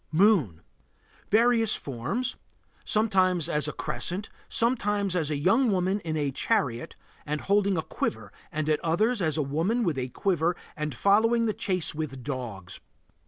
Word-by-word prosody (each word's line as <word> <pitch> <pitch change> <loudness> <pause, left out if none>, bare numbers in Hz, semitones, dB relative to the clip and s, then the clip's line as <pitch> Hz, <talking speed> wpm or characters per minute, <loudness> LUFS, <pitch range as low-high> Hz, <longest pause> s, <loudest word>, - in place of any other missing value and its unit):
MOON. 160 - +3 0.7
Various 225 0 +4
forms. 135 - -3 0.5
Sometimes 185 -6 +2
as 150 -3 0
a - - -2
crescent, 190 +6 -4 0.2
sometimes 205 -5 +1
as 160 -4 0
a 150 - 0
young 225 - +3
woman 190 +1 +1
in 160 -4 -3
a 145 -2 0
chariot 120 -2 -1 0.3
and 150 0 -3
holding 200 -1 +2
a 160 - -1
quiver, 110 -3 -3 0.2
and 155 0 -2
at 155 -1 +2
others 210 +8 +1
as 160 -3 0
a 155 - +1
woman 165 - 0
with 160 -9 0
a 130 0 -3
quiver 175 +3 0 0.2
and 150 -3 -3
following 225 - +3
the 215 - +1
chase 185 -5 -1
with 150 -5 -5
dogs. 120 -10 -6
175 Hz, 155 wpm, -27 LUFS, 150-205 Hz, 0.7 s, Various